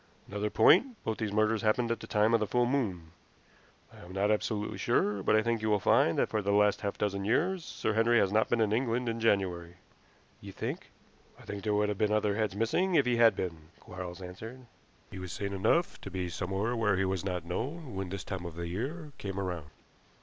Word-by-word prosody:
Another 105 +1 -2
point, 205 - +5
both 110 - -2
these 110 -2 -2
murders 110 +1 +2
happened 115 +2 +1
at 115 - -1
the - - -9
time 105 +1 +2
of 115 - +5
the 105 - -1
full 125 +2 +2
moon. 100 - -2 0.8
I - - -14
am 90 +1 -11
not 100 +2 +1
absolutely 105 0 -1
sure, 105 -1 +1
but 105 - +3
I 110 - +3
think 115 -1 0
you 110 - 0
will 105 -1 +3
find - - +3
that - - +2
for 110 - 0
the 100 0 0
last 105 0 +3
half 100 -1 -3
dozen 100 -1 -1
years 170 - +1
Sir 110 - -2
Henry 115 +2 +3
has 100 -3 +3
not 110 +1 +2
been 120 -1 +2
in 105 -1 +2
England 120 +1 0
in 115 0 -2
January." 90 -6 0 0.7
"You - - -9
think - - -5 0.2
" - - -29
"I - - -14
think 100 -1 -6
there 105 -1 +1
would 105 0 +2
have 105 - -3
been 105 -1 +2
other 105 -1 +1
heads 105 -2 -1
missing 170 - +1
if 140 - +4
he 125 -1 +1
had 115 -3 +6
been," 85 -5 -5
Quarles 90 0 -8
answered. 110 +8 -9 0.5
"He 95 - -7
was 90 -1 -6
sane 100 +1 -4
enough 130 - +1
to - - -7
be 90 -1 -3
somewhere 95 +7 -2
where 105 -4 +2
he 95 - +1
was 95 -2 -1
not 90 -3 -3
known 130 - -4
when 95 -1 -3
this 95 0 -5
time 90 -2 -5
of 85 - -9
the 85 0 -4
year 145 - -4
came 100 -1 -4
round. 90 -6 -4
105 Hz, 230 wpm, -30 LUFS, 95-115 Hz, 0.8 s, had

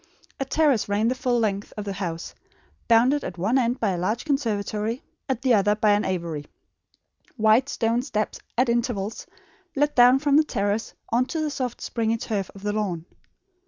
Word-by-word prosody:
A 270 - -1
terrace 275 -7 +2
ran 210 +3 +2
the - - +1
full 255 -1 0
length 205 -3 -1
of 210 - -4
the 200 - -3
house, 175 -4 -5 0.5
bounded 250 +6 +4
at 180 - -6
one 215 +10 +2
end 245 0 0
by 215 -4 +1
a 180 - -2
large 215 - -1
conservatory, 225 -4 -1 0.3
at 260 -1 -1
the 255 -2 +4
other 205 -1 +3
by 215 0 +3
an 205 0 +2
aviary. 165 -5 -3 0.9
Wide 220 +5 +4
stone 230 +1 0
steps, 215 -5 -2 0.2
at 250 +2 +3
intervals, 235 -3 -1 0.5
led 290 +1 +2
down 245 +1 +7
from 285 +1 +3
the 310 - +6
terrace 205 -5 -2 0.2
on 245 +3 +2
to 320 - -3
the 305 -1 -1
soft 255 -4 -4
springy 230 -1 -1
turf 205 -4 -3
of 195 - -12
the 205 0 -1
lawn. 185 -6 -2
225 Hz, 185 wpm, -24 LUFS, 205-255 Hz, 0.9 s, down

